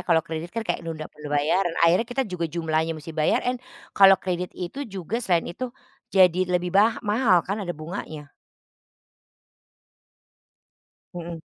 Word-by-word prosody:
Kalau 165 Hz, -2 st, +4 dB
kredit 160 Hz, +1 st, -5 dB
kan, 230 Hz, -, -1 dB
kayak -, -, -1 dB
nunda 155 Hz, -2 st, -5 dB
pembayaran. 150 Hz, +4 st, 0 dB
Akhirnya 175 Hz, +7 st, +4 dB
kita 245 Hz, +3 st, -1 dB
juga 170 Hz, -2 st, -1 dB
jumlahnya 160 Hz, 0 st, -1 dB
mesti 155 Hz, +1 st, -9 dB
bayarin. 165 Hz, +11 st, +1 dB, 0.4 s
Kalau 195 Hz, -1 st, +8 dB
kredit 180 Hz, -1 st, -2 dB
itu 180 Hz, +9 st, -6 dB
juga 195 Hz, 0 st, -4 dB
selain 175 Hz, -9 st, 0 dB
itu, 255 Hz, +9 st, -4 dB, 0.5 s
jadi 180 Hz, -2 st, +6 dB, 0.2 s
lebih 180 Hz, 0 st, 0 dB
bah 215 Hz, +3 st, +5 dB
mahal 210 Hz, -5 st, +3 dB
kan? 200 Hz, +3 st, -3 dB
Ada 175 Hz, -2 st, -4 dB
bunganya. 155 Hz, -2 st, -7 dB, 2.8 s
Mhm. 170 Hz, -1 st, -6 dB
175 Hz, 135 wpm, -25 LUFS, 160-195 Hz, 2.8 s, Kalau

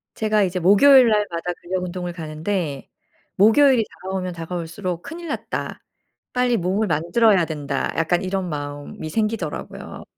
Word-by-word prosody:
제가 215 Hz, -1 st, +2 dB
이제 185 Hz, -1 st, -1 dB
목요일 245 Hz, +9 st, +7 dB
날마다 180 Hz, -5 st, 0 dB
근력 180 Hz, +1 st, -3 dB
운동을 180 Hz, -1 st, -4 dB
가는데 160 Hz, -2 st, -4 dB, 0.5 s
목요일이 230 Hz, +3 st, +5 dB, 0.2 s
다가오면 185 Hz, -1 st, -3 dB
다가올수록 170 Hz, +1 st, -5 dB
'큰일 340 Hz, +1 st, -8 dB
났다. 295 Hz, -, -4 dB, 0.5 s
빨리 250 Hz, -1 st, +2 dB
몸을 195 Hz, +4 st, 0 dB
만들어야 180 Hz, +4 st, +3 dB
된다.' 145 Hz, -3 st, -3 dB
약간 165 Hz, +2 st, +1 dB
이런 190 Hz, -1 st, -2 dB
마음이 145 Hz, +1 st, -6 dB
생기더라고요. 215 Hz, -4 st, -4 dB
185 Hz, 340 characters per minute, -22 LUFS, 165-215 Hz, 0.5 s, 목요일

